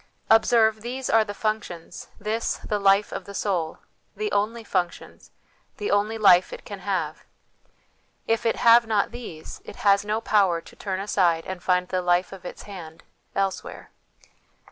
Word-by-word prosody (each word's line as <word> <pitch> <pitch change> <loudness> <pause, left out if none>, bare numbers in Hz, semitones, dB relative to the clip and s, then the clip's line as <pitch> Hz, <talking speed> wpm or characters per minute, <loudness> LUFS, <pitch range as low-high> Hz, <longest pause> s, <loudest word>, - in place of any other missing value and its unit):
Observe, 220 -1 +4
these 255 +3 -4
are 225 0 +5
the 210 - -6
func 215 +1 -1
tions, 170 0 -10
this, 215 +2 -2
the 210 -2 0
life 200 +1 +3
of - - -5
the 200 - -9
soul, 175 -7 -1 0.4
the 425 0 -3
only 225 +3 0
functions, 180 -4 -3 0.5
the 415 - -2
only 210 +2 +1
life 185 -4 +5
it - - -9
can 200 -1 -7
have: 180 -5 -3 1.0
if 225 0 0
it 230 - +1
have 235 0 +6
not 215 -2 +1
these, 195 -10 -9
it - - -10
has 200 0 +5
no 210 +1 -1
power 195 -6 +2
to - - -15
turn 190 -2 -4
aside 180 -5 +1
and 185 -1 -6
find 180 0 +1
the 185 - 0
"life 175 +1 +1
of 190 -2 -11
its - - -8
hand" 170 -6 -10 0.3
elsewhere. 195 -1 -3
200 Hz, 165 wpm, -25 LUFS, 180-220 Hz, 1.0 s, have